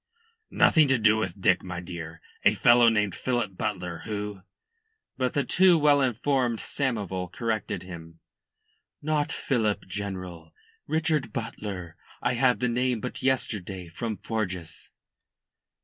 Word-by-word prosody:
"Nothing 155 Hz, -3 st, +5 dB
to 130 Hz, -1 st, +3 dB
do 110 Hz, -1 st, +4 dB
with 95 Hz, -3 st, -3 dB
Dick, 95 Hz, -1 st, +3 dB
my 90 Hz, -2 st, -5 dB
dear. 85 Hz, -2 st, -8 dB, 0.2 s
A -, -, +5 dB
fellow 120 Hz, -1 st, +6 dB
named 105 Hz, -4 st, +1 dB
Philip 120 Hz, -3 st, -2 dB
Butler, 90 Hz, -5 st, -3 dB
who 105 Hz, -2 st, -4 dB, 0.4 s
" 445 Hz, 0 st, -51 dB
But 130 Hz, -1 st, 0 dB
the 140 Hz, -, +2 dB
too 180 Hz, +2 st, +5 dB
well 145 Hz, -2 st, +4 dB
informed 125 Hz, -1 st, +1 dB
Samoval 100 Hz, -, -3 dB
corrected 115 Hz, -3 st, -2 dB
him. 80 Hz, -2 st, -10 dB, 0.8 s
"Not 150 Hz, 0 st, 0 dB
Philip, 110 Hz, -6 st, 0 dB
General 90 Hz, -4 st, -6 dB, 0.3 s
Richard 155 Hz, -5 st, 0 dB
Butler. 100 Hz, -7 st, -5 dB, 0.2 s
I 125 Hz, -, 0 dB
had 125 Hz, -2 st, +2 dB
the 125 Hz, -, +2 dB
name 125 Hz, 0 st, 0 dB
but 125 Hz, -, -6 dB
yesterday 100 Hz, -9 st, -1 dB
from 110 Hz, +5 st, -4 dB
Forjas." 90 Hz, -6 st, -4 dB
110 Hz, 135 wpm, -27 LUFS, 90-130 Hz, 0.8 s, fellow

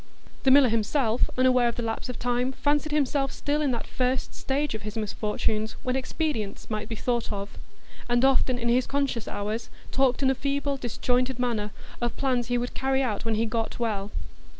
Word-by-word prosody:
The 270 Hz, -, +3 dB
miller 265 Hz, -1 st, +7 dB
himself, 230 Hz, +2 st, +1 dB
unaware 255 Hz, -1 st, +5 dB
of 235 Hz, -, -1 dB
the 240 Hz, -, -3 dB
lapse 225 Hz, +2 st, -3 dB
of 250 Hz, -, -4 dB
time, 245 Hz, +2 st, 0 dB
fancied 295 Hz, +2 st, +1 dB
himself 280 Hz, -2 st, +1 dB
still 295 Hz, +1 st, -1 dB
in 290 Hz, -, +2 dB
that 235 Hz, -, -3 dB
first 255 Hz, 0 st, -1 dB
stage 280 Hz, +1 st, -1 dB
of 220 Hz, -, -4 dB
his 210 Hz, +1 st, -6 dB
misfortunes 215 Hz, +1 st, -1 dB
when 255 Hz, 0 st, 0 dB
expedients 260 Hz, -7 st, -2 dB
might 215 Hz, 0 st, -3 dB
be 225 Hz, -, -3 dB
thought 240 Hz, +1 st, -1 dB
of; 200 Hz, 0 st, -5 dB, 0.5 s
and 240 Hz, +2 st, +4 dB
often 260 Hz, -1 st, +3 dB
in 235 Hz, -1 st, -2 dB
his 245 Hz, +2 st, +3 dB
conscious 275 Hz, -5 st, -1 dB
hours 215 Hz, +3 st, -3 dB, 0.2 s
talked 265 Hz, 0 st, +2 dB
in 265 Hz, -, +5 dB
a -, -, +3 dB
feeble, 280 Hz, +1 st, -1 dB
disjointed 250 Hz, +1 st, 0 dB
manner 235 Hz, -4 st, 0 dB, 0.3 s
of 240 Hz, -1 st, -1 dB
plans 250 Hz, -4 st, +1 dB
he 245 Hz, 0 st, +1 dB
would 245 Hz, +1 st, -2 dB
carry 270 Hz, 0 st, +1 dB
out 220 Hz, -3 st, -2 dB
when 225 Hz, -1 st, +1 dB
he 225 Hz, +2 st, +1 dB
"got 225 Hz, 0 st, -2 dB
well." 210 Hz, -4 st, -1 dB
245 Hz, 195 wpm, -27 LUFS, 225-265 Hz, 0.5 s, miller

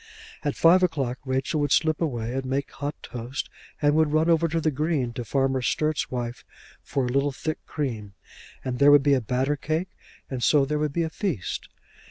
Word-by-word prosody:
At 145 Hz, -2 st, -1 dB
five 175 Hz, +3 st, +6 dB
o'clock 140 Hz, -8 st, 0 dB
Rachel 130 Hz, +4 st, 0 dB
would 145 Hz, -1 st, 0 dB
slip 155 Hz, -1 st, +2 dB
away 120 Hz, -7 st, -2 dB
and 135 Hz, 0 st, -2 dB
make 135 Hz, +2 st, -2 dB
hot 145 Hz, +1 st, -4 dB
toast, 125 Hz, +3 st, -5 dB, 0.3 s
and 145 Hz, 0 st, +5 dB
would 155 Hz, -1 st, +3 dB
run 155 Hz, +2 st, +3 dB
over 165 Hz, 0 st, +3 dB
the 160 Hz, -1 st, 0 dB
Green 145 Hz, -4 st, -1 dB
to 120 Hz, -, -4 dB
Farmer 135 Hz, +2 st, +1 dB
Sturt's 155 Hz, +5 st, 0 dB
wife 120 Hz, -1 st, -4 dB, 0.4 s
for 135 Hz, -2 st, -1 dB
a -, -, -2 dB
little 140 Hz, +3 st, +1 dB
thick 155 Hz, +4 st, -4 dB
cream, 110 Hz, -9 st, -4 dB, 0.5 s
and 125 Hz, -1 st, -2 dB
there 140 Hz, +1 st, +7 dB
would 145 Hz, -1 st, +7 dB
be 145 Hz, 0 st, +4 dB
a 130 Hz, -, +3 dB
batter 130 Hz, +5 st, 0 dB
cake, 155 Hz, +5 st, -2 dB, 0.4 s
and 130 Hz, -2 st, -5 dB
so 145 Hz, -3 st, +4 dB
there 150 Hz, +2 st, -1 dB
would 150 Hz, -1 st, 0 dB
be 170 Hz, +3 st, 0 dB
a 160 Hz, -, -3 dB
feast. 160 Hz, -, -3 dB
140 Hz, 200 wpm, -25 LUFS, 130-155 Hz, 0.5 s, there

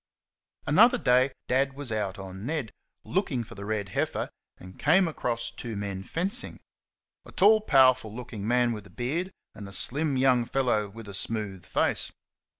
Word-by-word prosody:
Another 215 Hz, +12 st, +6 dB
day 130 Hz, +2 st, +3 dB, 0.2 s
Dad 135 Hz, +2 st, +2 dB
was 140 Hz, -3 st, -6 dB
out 105 Hz, -3 st, -2 dB
on 95 Hz, 0 st, -8 dB
Ned, 140 Hz, -4 st, -3 dB, 0.3 s
looking 155 Hz, -, -1 dB
for -, -, -12 dB
the 100 Hz, 0 st, -8 dB
red 105 Hz, -2 st, -2 dB
heifer, -, -, -2 dB, 0.3 s
and 95 Hz, +1 st, -13 dB
came 175 Hz, +5 st, +4 dB
across 120 Hz, -7 st, -2 dB
two 115 Hz, -3 st, -6 dB
men 100 Hz, -1 st, -4 dB
fencing 175 Hz, -, -2 dB, 0.6 s
a -, -, -14 dB
tall, 215 Hz, +3 st, +5 dB
powerful 130 Hz, -, +4 dB
looking 110 Hz, -3 st, -6 dB
man 120 Hz, 0 st, +3 dB
with 105 Hz, -2 st, -8 dB
a -, -, -19 dB
beard, 160 Hz, +10 st, -3 dB, 0.2 s
and 100 Hz, -2 st, -9 dB
a -, -, -11 dB
slim 140 Hz, +8 st, +1 dB
young 130 Hz, -2 st, +4 dB
fellow 120 Hz, -6 st, 0 dB
with 110 Hz, +1 st, -11 dB
a 100 Hz, -, -8 dB
smooth 100 Hz, -2 st, -4 dB
face. -, -, 0 dB
120 Hz, 165 wpm, -27 LUFS, 105-140 Hz, 0.6 s, Another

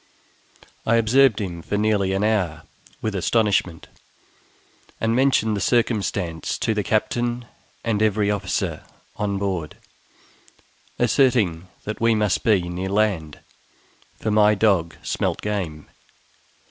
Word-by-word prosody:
I 115 Hz, -, +2 dB
observed 115 Hz, 0 st, +4 dB
him 90 Hz, -5 st, -4 dB
for 100 Hz, -, -3 dB
nearly 105 Hz, -2 st, +1 dB
an 95 Hz, +1 st, 0 dB
hour 90 Hz, -7 st, 0 dB, 0.4 s
with 110 Hz, -, -1 dB
astonishment, 100 Hz, -3 st, 0 dB, 1.1 s
and 115 Hz, 0 st, +1 dB
mentioned 125 Hz, -5 st, +2 dB
the 100 Hz, -, -3 dB
circumstance 100 Hz, -8 st, 0 dB
to 110 Hz, -, 0 dB
the 105 Hz, -, 0 dB
captain 120 Hz, +3 st, -1 dB, 0.4 s
and 110 Hz, -2 st, 0 dB
every 105 Hz, -1 st, +2 dB
officer 105 Hz, -2 st, -2 dB, 0.3 s
on 100 Hz, -1 st, -1 dB
board, 95 Hz, -6 st, -3 dB, 1.2 s
asserting 115 Hz, -, +2 dB, 0.2 s
that 110 Hz, +1 st, -5 dB
we 115 Hz, -1 st, +4 dB
must 105 Hz, -3 st, +1 dB
be 100 Hz, -6 st, +2 dB
near 90 Hz, +2 st, -4 dB
land, 95 Hz, -7 st, 0 dB, 0.8 s
for 110 Hz, -, -1 dB
my 105 Hz, 0 st, +5 dB
dog 95 Hz, -7 st, +2 dB
smelt -, -, -1 dB
game. 90 Hz, -8 st, -3 dB
105 Hz, 120 wpm, -23 LUFS, 95-110 Hz, 1.2 s, my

